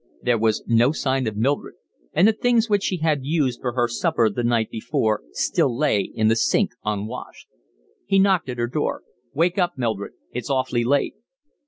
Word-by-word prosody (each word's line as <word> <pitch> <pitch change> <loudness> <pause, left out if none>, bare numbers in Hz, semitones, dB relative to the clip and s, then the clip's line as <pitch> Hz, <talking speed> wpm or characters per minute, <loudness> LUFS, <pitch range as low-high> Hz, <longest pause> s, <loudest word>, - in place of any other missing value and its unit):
There 120 -2 +2
was 110 -1 +1
no 115 +3 +3
sign 135 -4 -1
of 105 -1 -4
Mildred, 135 +6 -1 0.4
and 185 - +4
the 220 - +4
things 235 +1 +2
which 205 -2 +2
she 185 - -1
had 155 -3 +1
used 140 -4 0
for 125 -2 -2
her 120 -1 +1
supper 115 -1 +1
the 120 +4 -3
night 115 -2 +1
before 110 -1 -1
still 115 - 0
lay 140 -8 +2
in 110 +2 -1
the 110 - +4
sink 115 - +2
unwashed. 105 +3 -5 0.6
He 195 - +3
knocked 190 -7 +3
at 125 - -4
her 120 - 0
door. 145 +5 -2 0.3
"Wake 175 +5 +1
up, 175 -5 0
Mildred. 110 -5 -2 0.2
It's 125 +3 -5
awfully 130 -3 0
late." 140 +4 +1
125 Hz, 185 wpm, -23 LUFS, 115-155 Hz, 0.6 s, and